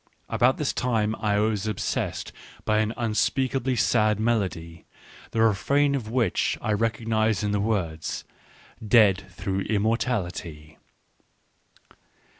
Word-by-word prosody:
About 130 Hz, +2 st, +3 dB
this 150 Hz, -, -1 dB
time 110 Hz, -3 st, 0 dB
I 105 Hz, -2 st, +1 dB
was 105 Hz, 0 st, 0 dB
obsessed 105 Hz, -3 st, -2 dB, 0.3 s
by 110 Hz, 0 st, +2 dB
an 110 Hz, 0 st, +1 dB
un 115 Hz, -3 st, -1 dB
speakably 130 Hz, +3 st, 0 dB
sad 110 Hz, -3 st, +2 dB
melody 95 Hz, -7 st, -1 dB, 0.4 s
^ -, -, -30 dB
the 115 Hz, -, +2 dB
refrain 140 Hz, +7 st, +2 dB
of 125 Hz, -6 st, -3 dB
which 120 Hz, 0 st, +1 dB
I 110 Hz, -, -1 dB
recognised 110 Hz, -2 st, 0 dB
in 105 Hz, -, 0 dB
the 105 Hz, -, 0 dB
affords, 90 Hz, -7 st, -2 dB, 0.3 s
" 110 Hz, -, -15 dB
dead 100 Hz, -2 st, +4 dB
through 95 Hz, +1 st, -3 dB
immor 110 Hz, +2 st, +1 dB
tality 85 Hz, -, -4 dB
110 Hz, 130 wpm, -25 LUFS, 100-115 Hz, 0.4 s, dead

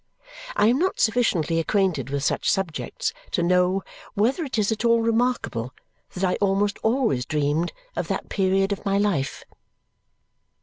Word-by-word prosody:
I -, -, +3 dB
am 240 Hz, +5 st, +3 dB
not 370 Hz, +3 st, 0 dB
sufficiently 185 Hz, -9 st, +2 dB
acquainted 170 Hz, -, 0 dB
with 140 Hz, 0 st, -2 dB
such -, -, +1 dB
subjects 185 Hz, -5 st, -2 dB, 0.2 s
to 175 Hz, -, 0 dB
know 180 Hz, +2 st, +2 dB, 0.3 s
whether 245 Hz, -, +1 dB
it 265 Hz, -5 st, -4 dB
is 210 Hz, 0 st, +2 dB
at 220 Hz, +1 st, -2 dB
all 235 Hz, 0 st, +4 dB
remarkable 225 Hz, -, 0 dB, 0.4 s
that 185 Hz, -, -4 dB
I 180 Hz, -, +2 dB
almost 200 Hz, 0 st, +1 dB
always 220 Hz, -, +1 dB
dreamed 150 Hz, +4 st, 0 dB, 0.2 s
of -, -, -2 dB
that -, -, -3 dB
period 195 Hz, 0 st, +1 dB
of 200 Hz, -, -3 dB
my 195 Hz, 0 st, +1 dB
life. 200 Hz, -10 st, 0 dB
195 Hz, 155 wpm, -24 LUFS, 165-220 Hz, 0.4 s, all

